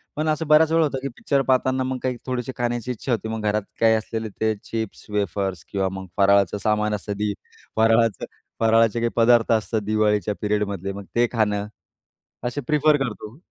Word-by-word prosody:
पण 155 +1 -1
असं 155 0 -1
बऱ्याच 155 +1 +5
वेळा 165 0 +4
होतं 140 -3 -1
की 140 - -3
पिक्चर 140 -1 +1
पाहताना 130 0 +1
मग 130 0 -2
काही 125 -1 -1
थोडीशी 125 -1 -3
खाण्याची 120 0 -2
इच्छा 125 +2 -4
होते, 110 -1 -1
मग 110 0 -3
घरात 105 +1 +1 0.2
काही 115 -1 +5
असलेले 110 0 -3
ते 110 0 +2
चिप्स-वेफर्स 100 -4 -3
किंवा 95 -1 0
मग 95 0 -6
फराळाचं 100 -1 +4
सामान 105 0 +1
असतं, 105 +1 -5
दि 105 0 -1 0.4
फराळाचं 115 0 +3 0.3
फराळाचे 115 0 +3
काही 120 0 +1
पदार्थ 115 -1 +4
असतात 110 0 +1
दिवाळीच्या 105 -2 +1
पिरियडमधले, 100 -2 -1
मग 100 0 -8
ते 120 0 +4
खाणं, 105 -3 0 0.8
असं 145 +4 -3
प्रिफर 150 0 +4
करतो. 110 0 -7
110 Hz, 175 wpm, -23 LUFS, 105-125 Hz, 0.8 s, बऱ्याच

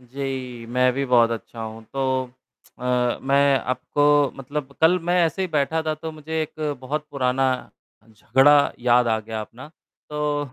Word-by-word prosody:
जी, 130 -2 -6
मैं 125 +1 +2
भी 140 +2 -1
बहुत 120 -2 +4
अच्छा 115 0 -6
हूँ। 110 0 -8
तो 130 -1 -1 0.5
अ, 125 -1 0
मैं 140 0 +3
आपको 145 +3 +2
मतलब 140 +1 -5
कल 165 +3 +5
मैं 175 +1 0
ऐसे 165 +4 -1
ही 185 - -2
बैठा 155 +1 0
था 155 -1 -1
तो 160 +1 -7
मुझे 160 +1 -4
एक 155 -1 -4
बहुत 150 +4 -4
पुराना 135 -1 0 0.6
झगड़ा 135 +7 +4
याद 120 0 +3
आ 110 -1 +2
गया 110 0 -5
अपना। 120 +6 -10 0.4
तो, 150 -1 -1
135 Hz, 160 wpm, -23 LUFS, 125-150 Hz, 0.6 s, कल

